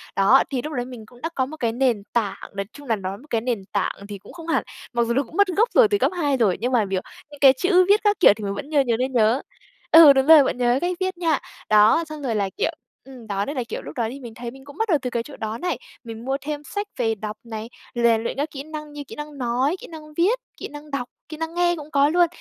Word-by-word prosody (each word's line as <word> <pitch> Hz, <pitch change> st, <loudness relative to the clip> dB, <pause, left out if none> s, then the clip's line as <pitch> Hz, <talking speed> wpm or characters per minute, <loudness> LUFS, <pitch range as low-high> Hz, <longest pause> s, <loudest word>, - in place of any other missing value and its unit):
Đó, 210 Hz, +8 st, +5 dB
thì 265 Hz, -3 st, -2 dB
lúc 305 Hz, +4 st, -6 dB
đấy 245 Hz, -2 st, -2 dB
mình 245 Hz, -4 st, -10 dB
cũng 245 Hz, +2 st, -19 dB
đã 330 Hz, -, -2 dB
có 260 Hz, -, +1 dB
một 310 Hz, +3 st, -9 dB
cái 230 Hz, -4 st, 0 dB
nền 240 Hz, -4 st, +1 dB
tảng, 220 Hz, -4 st, -2 dB
nói 195 Hz, 0 st, -2 dB
chung 285 Hz, -2 st, -12 dB
là 225 Hz, -, +2 dB
nói 195 Hz, 0 st, -5 dB
một 290 Hz, -, -17 dB
cái 225 Hz, -1 st, 0 dB
nền 235 Hz, -5 st, -2 dB
tảng 200 Hz, -, -1 dB
thì 200 Hz, -, -6 dB
cũng 200 Hz, -, -15 dB
không 335 Hz, -1 st, -10 dB
hẳn, 330 Hz, -, +1 dB, 0.3 s
mặc 235 Hz, 0 st, +2 dB
dù 235 Hz, -, +1 dB
nó 275 Hz, +3 st, +2 dB
cũng 320 Hz, -, -12 dB
mất 405 Hz, -, +5 dB
gốc 405 Hz, +6 st, +2 dB
rồi 480 Hz, -4 st, +7 dB
từ 410 Hz, -, +1 dB
cấp -, -, +1 dB
2 285 Hz, -5 st, +1 dB
rồi, 205 Hz, -7 st, +2 dB
nhưng 245 Hz, +2 st, 0 dB
mà, 230 Hz, -5 st, +3 dB
kiểu, 190 Hz, -1 st, 0 dB, 0.3 s
những 290 Hz, -, -12 dB
cái 270 Hz, -2 st, +8 dB
chữ 365 Hz, -1 st, +4 dB
viết 415 Hz, +1 st, +6 dB
các 415 Hz, 0 st, +2 dB
kiểu 355 Hz, -, +8 dB
thì 215 Hz, -, -9 dB
mình 200 Hz, 0 st, -2 dB
vẫn 200 Hz, -, -5 dB
nh 290 Hz, -3 st, +3 dB
nhiều 230 Hz, -, +2 dB
nên 255 Hz, +2 st, -1 dB
nhớ. 230 Hz, +2 st, +3 dB, 0.5 s
Ừ, 320 Hz, -4 st, +10 dB
đúng 265 Hz, +1 st, +2 dB
rồi, 315 Hz, -3 st, +9 dB
vẫn 255 Hz, -, -1 dB
nhớ 245 Hz, 0 st, +2 dB
cách 355 Hz, 0 st, -1 dB
viết 375 Hz, -1 st, -2 dB
nha. 325 Hz, -4 st, +1 dB, 0.3 s
Đó, 215 Hz, +9 st, +5 dB
xong 305 Hz, -1 st, -7 dB
rồi 240 Hz, -5 st, -1 dB
là, 200 Hz, -2 st, 0 dB
kiểu 470 Hz, -, +1 dB, 0.3 s
ừm, 255 Hz, -4 st, -13 dB
đó 200 Hz, 0 st, -1 dB
nên 285 Hz, -, -5 dB
là, 250 Hz, -, 0 dB
kiểu, -, -, -4 dB
lúc -, -, -9 dB
đó 230 Hz, -3 st, 0 dB
thì 275 Hz, -, -8 dB
mình 235 Hz, -4 st, -9 dB
thấy 240 Hz, -1 st, -6 dB
mình 265 Hz, +1 st, -15 dB
cũng 285 Hz, -, -13 dB
bắt 445 Hz, 0 st, -1 dB
đầu 320 Hz, -, +4 dB
từ 250 Hz, -, -3 dB
cái 235 Hz, -1 st, -2 dB
chỗ 295 Hz, -, -12 dB
đó 220 Hz, +1 st, -4 dB
này, 360 Hz, -, -2 dB, 0.3 s
mình 230 Hz, 0 st, -8 dB
mua 270 Hz, +1 st, 0 dB
thêm 295 Hz, 0 st, -5 dB
sách 410 Hz, +6 st, -4 dB
về 225 Hz, -2 st, +1 dB
đọc 215 Hz, +1 st, -6 dB
này, 225 Hz, 0 st, -7 dB, 0.3 s
rèn 235 Hz, -1 st, +3 dB
luyện -, -, -3 dB
các 290 Hz, +2 st, -2 dB
kỹ 275 Hz, -1 st, -6 dB
năng 305 Hz, -1 st, -8 dB
như 290 Hz, -, -6 dB
kỹ -, -, -9 dB
năng 295 Hz, -1 st, -8 dB
nói, 255 Hz, +5 st, 0 dB
kỹ -, -, -10 dB
năng 305 Hz, -2 st, -11 dB
viết, 405 Hz, +9 st, +3 dB, 0.2 s
kỹ -, -, -6 dB
năng 295 Hz, 0 st, -11 dB
đọc, 250 Hz, -3 st, -3 dB, 0.2 s
kỹ 310 Hz, -, -7 dB
năng 325 Hz, 0 st, -4 dB
nghe 350 Hz, 0 st, +2 dB
cũng 305 Hz, -2 st, -10 dB
có 280 Hz, +1 st, +4 dB
luôn. 350 Hz, +1 st, +4 dB
270 Hz, 295 wpm, -23 LUFS, 230-310 Hz, 0.5 s, Ừ